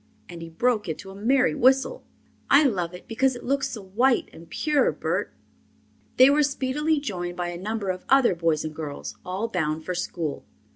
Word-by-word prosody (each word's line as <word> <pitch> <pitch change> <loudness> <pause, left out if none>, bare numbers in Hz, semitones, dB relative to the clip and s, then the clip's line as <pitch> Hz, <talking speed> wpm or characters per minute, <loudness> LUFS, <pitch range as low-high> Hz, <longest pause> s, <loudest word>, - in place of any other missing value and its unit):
And 170 -1 -9
he 165 - -7
broke 215 +3 0
into 190 +5 -6
a - - -11
merry 255 +5 +2
whistle. 265 - +2 0.5
"I 280 +2 +7
love 180 - 0
it 180 - -13
because 260 +3 +1
it 240 - -9
looks 275 +2 0
so 215 -4 -7
white 235 +7 +1
and 165 0 -13
pure, 300 - +1
Bert." - - -2 0.9
They 255 - +8
were 295 +1 +3
speedily 290 +2 0
joined 175 -9 -4
by 175 -1 -2
a 175 0 -7
number 210 -1 -2
of 185 0 -8
other 270 -6 +5
boys 165 -3 0
and 155 - -5
girls, 150 -2 -6
all 190 +5 -3
bound 160 -6 -2
for 180 - -2
school. 170 -4 -4
205 Hz, 190 wpm, -25 LUFS, 175-265 Hz, 0.9 s, They